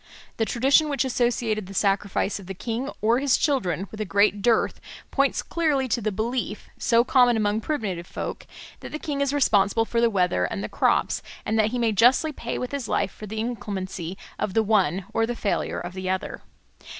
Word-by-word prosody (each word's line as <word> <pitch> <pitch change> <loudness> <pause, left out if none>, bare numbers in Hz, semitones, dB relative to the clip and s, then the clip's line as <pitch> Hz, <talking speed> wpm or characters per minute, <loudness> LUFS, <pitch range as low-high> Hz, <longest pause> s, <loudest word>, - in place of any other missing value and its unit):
The 225 - +1
tradition 275 +7 +3
which 280 -1 0
associated 235 -5 0
the 195 - -9
sacrifice 200 0 0
of 190 - -12
the 195 - -6
king 235 +7 -3
or 230 +3 +4
his 275 -2 +3
children 195 - 0
with 215 - -6
a - - +1
great 205 +1 +2
dearth 230 +1 +2 0.3
points 275 -1 +1
clearly 300 -6 0
to 235 - 0
the 215 0 -1
belief, 220 +1 -3
so 235 0 +4
common 245 -2 +4
among 210 0 +1
primitive 205 - -3
folk, - - -6 0.3
that - - -9
the 305 - -3
king 290 -3 -3
is 280 -1 +1
responsible 225 -6 +3
for 235 +1 0
the 235 - +4
weather 180 - +1
and 95 +2 -4
the 105 - -4
crops, - - +1 0.2
and 220 +1 0
that 215 0 +3
he 250 - -3
may 230 -2 +2
justly 245 - +4
pay - - -5
with 250 - -4
his 280 -5 -3
life 195 - 0
for 215 - -10
the 215 +2 -5
inclemency 195 -6 -4 0.2
of 190 - -2
the 225 - +4
one 195 -4 +2
or 225 0 +1
the 240 - -3
failure 205 - -1
of 175 0 -6
the 185 0 -4
other. 190 0 -3
220 Hz, 205 wpm, -25 LUFS, 195-250 Hz, 0.3 s, or